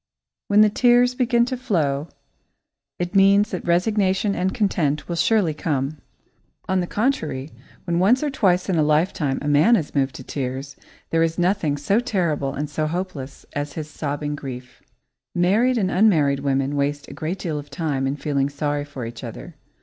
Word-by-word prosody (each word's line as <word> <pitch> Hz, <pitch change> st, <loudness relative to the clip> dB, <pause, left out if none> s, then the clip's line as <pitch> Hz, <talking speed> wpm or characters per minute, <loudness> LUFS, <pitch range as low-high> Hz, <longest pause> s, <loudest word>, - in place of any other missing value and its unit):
When 205 Hz, +1 st, +5 dB
the 215 Hz, -, +6 dB
tears 245 Hz, +2 st, +4 dB
begin 240 Hz, -1 st, +2 dB
to 255 Hz, -, -3 dB
flow, 160 Hz, -, -1 dB, 0.9 s
it 175 Hz, +1 st, -3 dB
means 200 Hz, +1 st, +5 dB
that 185 Hz, -, -4 dB
resignation 190 Hz, +2 st, +2 dB
and 185 Hz, 0 st, 0 dB
content 155 Hz, -10 st, 0 dB
will 170 Hz, -, -3 dB
surely 185 Hz, -2 st, +2 dB
come. 145 Hz, -1 st, -2 dB, 0.7 s
On 190 Hz, 0 st, +1 dB
the 175 Hz, -, -1 dB
contrary, 160 Hz, -, -1 dB, 0.3 s
when 170 Hz, -1 st, -1 dB
once 235 Hz, +10 st, +4 dB
or 295 Hz, -, 0 dB
twice 185 Hz, -8 st, +2 dB
in 185 Hz, -4 st, +1 dB
a -, -, +4 dB
lifetime 150 Hz, -2 st, +1 dB
a -, -, -3 dB
man 150 Hz, +11 st, +5 dB
is 165 Hz, -9 st, -2 dB
moved 135 Hz, -2 st, 0 dB
to -, -, -8 dB
tears, 135 Hz, +1 st, -5 dB, 0.4 s
there 165 Hz, -, +2 dB
is 165 Hz, 0 st, +1 dB
nothing 175 Hz, -5 st, +1 dB
so 195 Hz, +10 st, +1 dB
terrible 170 Hz, -, -1 dB
and 150 Hz, +1 st, -2 dB
so 155 Hz, +1 st, -2 dB
hopeless 160 Hz, -5 st, -5 dB
as 145 Hz, 0 st, -3 dB
his 155 Hz, -1 st, -6 dB
sobbing 145 Hz, 0 st, -3 dB
grief. 130 Hz, -3 st, -8 dB, 0.5 s
Married 215 Hz, +9 st, +3 dB
and 190 Hz, -4 st, 0 dB
unmarried 160 Hz, -9 st, +3 dB
women 135 Hz, 0 st, 0 dB
waste 145 Hz, 0 st, -1 dB
a -, -, -9 dB
great 165 Hz, +5 st, -3 dB
deal 160 Hz, -5 st, -3 dB
of 145 Hz, -, -10 dB
time 145 Hz, -6 st, -2 dB
in 135 Hz, -, -1 dB
feeling 140 Hz, -2 st, -1 dB
sorry 145 Hz, 0 st, -2 dB
for 140 Hz, -4 st, -7 dB
each 115 Hz, 0 st, -8 dB
other. -, -, -8 dB
160 Hz, 180 wpm, -22 LUFS, 145-195 Hz, 0.9 s, the